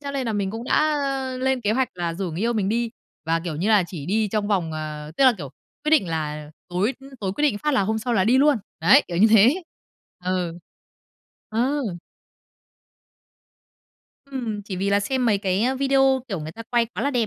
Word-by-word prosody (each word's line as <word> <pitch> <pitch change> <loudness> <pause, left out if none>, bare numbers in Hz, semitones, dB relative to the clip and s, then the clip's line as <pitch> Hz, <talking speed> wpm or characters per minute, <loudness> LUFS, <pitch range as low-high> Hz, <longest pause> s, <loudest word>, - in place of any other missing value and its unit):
cho 280 -1 -5
nên 270 -2 -3
là 225 - -1
mình 200 -2 -1
cũng 225 +3 -6
đã 305 +2 +2 0.4
lên 265 -1 +1
kế 210 -1 +1
hoạch 260 +1 +1
là 170 -2 -3
rủ 185 -1 -3
người 165 +3 -5
yêu 235 +2 +1
mình 205 -4 0
đi 230 +2 0 0.3
và, 165 +1 +1
kiểu 165 -3 -4
như 185 +7 -1
là, 210 -4 +5
chỉ 160 -5 -7
đi 210 +2 +1
trong 210 0 -1
vòng, 180 -6 0
ờ 155 -1 -6
tức 275 - +4
là, 255 - +7
kiểu, 140 -5 -7 0.3
quyết 305 - +1
định 260 - +4
là 150 -2 -4 0.2
tối 185 +8 0 0.3
tối 190 -2 -2
quyết 295 - -4
định 255 -9 +2
phát 300 +4 0
là - - +3
hôm 220 +3 0
sau 240 +3 -2
là 190 -5 +3
đi 250 +4 +4
luôn 290 -1 +5 0.2
đấy, 275 - +6
kiểu 175 - -4
như 200 +5 +6
thế. 235 - +5 0.6
Ừ. 180 -2 -2 0.9
Ờ. 260 +7 0 2.5
Ừm, 230 -6 -4
chỉ 195 -2 -6
vì 195 +2 -1
là 200 0 +3
xem 250 +4 0
mấy 210 -3 +3
cái 190 0 0 0.2
video, 270 -1 +3
kiểu, 195 -6 -3
người 155 +1 -6
ta 230 - -9
quay 235 0 +1
quá - - -6
là 280 - +1
đẹp 245 -5 +1
215 Hz, 215 wpm, -23 LUFS, 180-255 Hz, 2.5 s, là